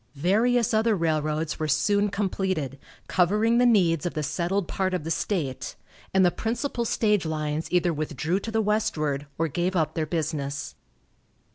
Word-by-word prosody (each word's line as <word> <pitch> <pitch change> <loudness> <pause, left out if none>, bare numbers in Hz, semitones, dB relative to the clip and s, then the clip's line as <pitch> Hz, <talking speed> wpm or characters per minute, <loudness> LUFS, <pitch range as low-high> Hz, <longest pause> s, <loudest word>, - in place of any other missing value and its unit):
Various 225 - +2
other 220 0 +3
railroads 155 -2 -1
were 155 - -1
soon 200 +8 +2
completed, 185 - -2 0.3
covering 210 +6 +3
the 245 - +5
needs 175 -9 +3
of 175 - -5
the 155 - -1
settled 175 +5 -1
part 190 -1 -1
of 180 - -3
the 165 - -3
state, 155 -9 -2 0.4
and 190 -1 +4
the 175 - +4
principal 235 +3 -2
stage 210 -4 +2
lines 155 -1 -3
either 175 -1 +2
withdrew 155 +4 -1
to 225 - -6
the 220 0 +1
westward, 155 -9 0
or 165 - +1
gave 175 +5 -1
up 160 -3 +1
their 160 -2 -2
business. 150 -3 -3
175 Hz, 160 wpm, -26 LUFS, 155-205 Hz, 0.4 s, the